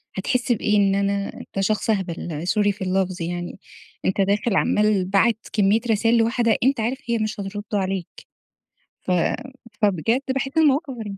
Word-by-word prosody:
هتحس 245 +6 -1
بإيه 210 -2 +2
إن 195 -1 +3
أنا 200 0 -1
أنت 195 - -7
شخص 215 +2 0
أهبل 175 -5 -2
sorry 205 +1 +2
في 195 - -11
اللفظ 185 -1 -1
يعني، 175 +2 -4 0.5
أنتَ 190 +1 +1
داخل 205 +2 +1
عمال 210 -3 +2
باعت 210 +4 +1
كمية 210 +1 +3
رسايل 225 +2 +3
لواحدة 230 0 +2
أنت 265 -1 +2
عارف 235 +4 -1
هي 235 - +2
مش 215 -1 -3
هترد 205 +1 -5
عليك، 190 -3 -1 0.9
ف - - -3 0.7
فبجد 210 - +2
باحس 270 +1 -1
المواقف 295 -2 +3
غري 210 -4 -7
205 Hz, 155 wpm, -22 LUFS, 195-230 Hz, 0.9 s, إن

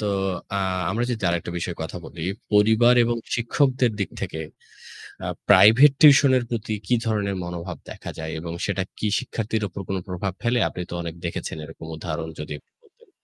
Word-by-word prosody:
তো 105 - -2 0.5
আ - - 0 0.3
আমরা 115 +4 0
যদি 115 -4 -3
আরেকটা 85 0 -1
বিষয়ে 85 0 -4
কথা 80 +3 -6
বলি। 80 0 -7 0.3
পরিবার 110 +4 +5
এবং 120 0 0 0.2
শিক্ষকদের 125 +1 +2
দিক 100 - -1
থেকে 80 - -4 0.9
আ - - -2 0.2
প্রাইভেট 120 +8 +8
টিউশন 140 -2 +8
এর 120 - 0
প্রতি 110 -2 -3
কি 125 - +3
ধরনের 105 -3 0
মনোভাব 85 0 -5
দেখা - - -7
যায় 80 0 -5
এবং 85 +1 -6
সেটা 100 -2 -1
কি 110 - -1
শিক্ষার্থীর 110 -4 -2
উপর 100 +2 -7
কোনো 95 -1 -1
প্রভাব 90 +1 -3
ফেলে? 120 +1 +2
আপনি 90 - -6
তো - - -6
অনেক 85 -1 -5
দেখেছেন 85 -1 -4
এরকম 80 0 -11
উদাহরণ 80 0 -4
যদি 75 0 -5
একটু - - -21
বলতেন। - - -26
100 Hz, 180 wpm, -24 LUFS, 85-120 Hz, 0.9 s, প্রাইভেট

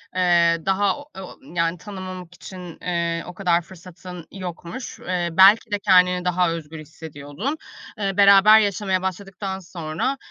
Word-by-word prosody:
ııı, 170 -2 +3
daha 195 +5 +1
o 285 - -12
o 190 -1 -9 0.2
yani 170 0 0
tanımamak 185 -2 -8
için, 180 -2 -10
ııı, 170 -1 -1
o 180 - -8
kadar 175 -2 +1
fırsatın 180 0 -12
yokmuş. 180 +4 -7
Iıı, 175 -2 -3
belki 200 +4 +6
de 205 - 0
kendini 180 -2 +3
daha 180 -1 +2
özgür 160 -1 -7
hissediyordun. 155 - -7 0.4
Eee, 195 -2 -2
beraber 200 +2 +7
yaşamaya 195 -2 0
başladıktan 190 +1 -5
sonra, 170 - -4
180 Hz, 140 wpm, -22 LUFS, 170-195 Hz, 0.4 s, beraber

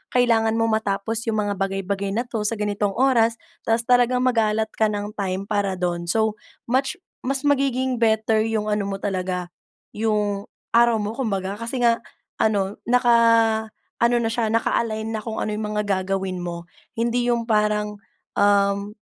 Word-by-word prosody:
kailangan 225 -3 +3
mong 225 0 +2
matapos 210 +2 -2
yung 215 -1 0
mga 205 - -1
bagay-bagay 195 0 -2
na 235 +3 0
ito 225 -3 -3
sa 210 - +1
ganitong 205 -2 -1
oras. 230 -2 +3 0.3
Tapos 225 +1 +2
talagang 250 0 +4
mag-a-allot 220 -3 +1
ka 220 - +2
ng 205 +1 -4
time 195 -1 -2
para 200 -3 0
dun 175 -1 -2
so 220 +2 +2 0.3
much 265 +7 +1 0.3
mas 270 +1 0
magiging 260 -2 +1
better 220 -1 +3
yung 215 -1 -1
ano 210 -1 0
mo 195 -1 -3
talaga, 185 -2 -2 0.5
yung 210 -2 0 0.3
araw 235 -1 +5
mo 210 +1 -3
kumbaga 195 -6 -2
kasi 230 +3 -4
nga, 230 0 +3 0.4
ano, 200 -2 +1
naka 245 -1 +4 0.8
ano 235 +1 +3
na 225 - 0
siya 230 0 0
naka-align 220 -1 0
na 225 - -2
kung 225 -1 -4
ano - - -1
yung 210 0 -3
mga 210 - +1 0.2
gagawin 190 -1 -2
mo, 170 0 -6 0.2
hindi 235 +1 0
yung 235 0 -3
parang, 210 -1 +1 0.4
um, 200 0 +2
215 Hz, 160 wpm, -23 LUFS, 200-235 Hz, 0.8 s, araw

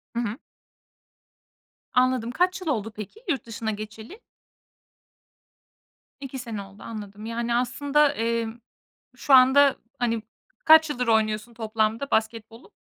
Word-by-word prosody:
Hı - - 0
hı. 230 0 -3 1.6
Anladım. 250 -2 +2
Kaç 365 +5 0
yıl 350 - -7
oldu, 225 -6 -1
peki, 215 - -9
yurt 275 -6 -1
dışına 225 -1 -4
geçeli? 215 - -9 2.0
2 270 -1 -7
sene 225 -4 -5
oldu, 195 +1 -13
anladım. 210 -1 -8
Yani, 235 +1 -2
aslında, 285 +4 +2
emm, 230 -1 -2 0.6
şu 275 - +3
anda, 265 +2 +6 0.2
hani, 230 -2 0 0.4
kaç 315 -1 +7
yıldır 250 -4 -2
oynuyorsun 220 +1 +1
toplamda 220 +3 -1
basketbolu? 225 - -2
230 Hz, 115 wpm, -25 LUFS, 220-265 Hz, 2.0 s, kaç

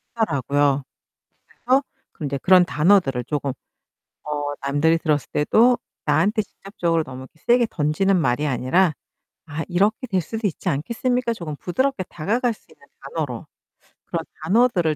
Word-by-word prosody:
하더라고요. 145 - +1 0.6
그래서 260 +3 +1 0.4
이제 140 -1 -2
그런 180 +4 +6
단어들을 150 - +3
쪼금 140 -1 -2 0.7
어 145 -1 -2
남들이 145 +4 +2
들었을 150 -3 0
때도 235 +11 +4 0.3
나한테 190 +9 +2
직접적으로 170 -5 -2
너무 130 -1 -9 0.2
세게 240 0 +4
던지는 170 +5 +1
말이 140 +2 +1
아니라 150 +7 +2 0.5
"아 155 +1 -4
이렇게 205 +7 +1
될 190 -4 +1
수도 220 +6 -3
있지 180 - -3
않겠습니까?" 235 - 0
조금 155 -7 -6
부드럽게 260 - -1
다가갈 230 - 0
수 - - -26
있는 - - -21
단어로. - - -5 0.6
그런 - - -3 0.2
단어들을 190 -8 +3
170 Hz, 330 characters per minute, -22 LUFS, 145-215 Hz, 0.7 s, 그런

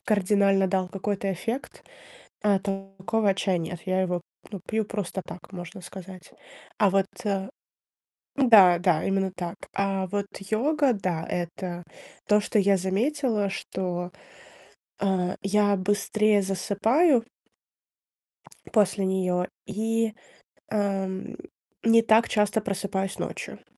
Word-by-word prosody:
кардинально 200 -2 +3
дал 185 -1 0
какой-то 195 0 -2
эффект, 230 - -5 0.6
а, 205 -2 +3
такого 195 +1 -1
чая 190 -2 +1
нет. 165 +1 -5
Я 185 0 +1
его 180 -2 -1 0.3
ну, 200 - -5
пью 220 -1 0
просто 200 -3 -4
так, 180 - -10
можно 175 0 -8
сказать. 185 -1 -11 0.5
А 205 - +4
вот, 195 0 +2 0.2
э 195 -2 -1 0.9
н-да, 205 -10 +7
да, 175 -3 +2
именно 195 -1 0
так. 175 -1 -4 0.2
А 195 -1 0
вот 200 +1 -2 0.2
йога, 280 +4 +2
да- 180 -6 -2
это 175 0 -4 0.5
то, 210 0 +5
что 210 +1 0
я 200 0 +4
заметила, 210 +3 0
что, 180 -2 -4 0.9
а, 185 -2 0
я 205 0 +3
быстрее 205 +2 +2
засыпаю 225 - +2 1.5
после 200 -2 +3
неё, 180 -1 0 0.2
и, 225 +1 -1 0.6
эм, 195 -2 -2 0.5
не 230 0 +6
так 225 0 +4
часто 210 +1 +2
просыпаюсь 195 -1 -3
ночью. - - -6
195 Hz, 115 wpm, -26 LUFS, 185-210 Hz, 1.5 s, н-да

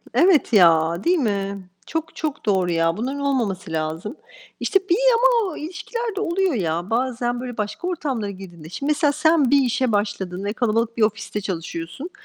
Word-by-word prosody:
Evet 340 -8 +4
ya, 170 -2 +4
değil 355 +1 +3
mi? 200 - -2 0.2
Çok, 320 0 -4
çok 295 -6 -4
doğru 190 -3 +2
ya! 165 0 +1
Bunların 265 +5 -3
olmaması 230 -12 -1
lazım. 160 - -3 0.4
İşte, 390 -2 +2
bir 350 - +5 0.2
ama 470 -4 +3
o - - -8
ilişkilerde 410 +6 -4
oluyor 375 -3 +1
ya 175 -3 -2
bazen, 245 0 -1
böyle, 250 -2 -6
başka 210 - -3
ortamlara 270 - -2
girdiğinde 175 -5 -10
Şimdi 275 - -3
mesela 295 -1 +2
sen 305 -3 +3
bir 280 -1 +5
işe 250 -1 +1
başladın 200 -2 -2
ve 205 - -1
kalabalık 230 0 0
bir 230 - 0
ofiste 210 0 0
çalışıyorsun. 170 - -5
230 Hz, 165 wpm, -22 LUFS, 190-300 Hz, 0.4 s, bir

